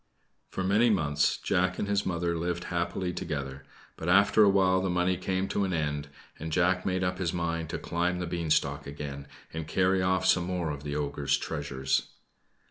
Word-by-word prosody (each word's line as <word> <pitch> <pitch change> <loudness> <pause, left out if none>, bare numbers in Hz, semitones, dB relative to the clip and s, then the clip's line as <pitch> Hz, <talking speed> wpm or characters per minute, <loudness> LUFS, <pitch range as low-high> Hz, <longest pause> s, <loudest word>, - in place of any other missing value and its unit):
For 95 - -3
many 105 +6 +4
months 75 -8 +2
Jack 90 +1 0
and - - -2
his 100 0 0
mother 85 -1 -1
lived 85 +1 -2
happily 85 +1 -1
together; 70 -4 -4 0.3
but 80 - -3
after 100 +3 +5
a 100 - +6
while 95 -1 +3
the 95 - -1
money 90 +1 +2
came 95 +1 -1
to 100 - 0
an 95 -1 -1
end, 75 -2 -1 0.3
and 80 +1 -5
Jack 90 +2 +2
made 95 -1 0
up 90 0 -1
his 85 -3 -1
mind 85 -2 -2
to - - -3
climb 90 +1 -1
the 90 - -2
beanstalk 75 -5 0
again, 70 -1 -6 0.3
and 80 -1 -4
carry 95 +3 +2
off 95 0 +1
some 90 - +4
more 90 -3 -2
of 70 -1 -6
the 75 0 -4
ogre's 70 -1 0
treasures. 70 -4 -2
85 Hz, 190 wpm, -29 LUFS, 75-95 Hz, 0.3 s, a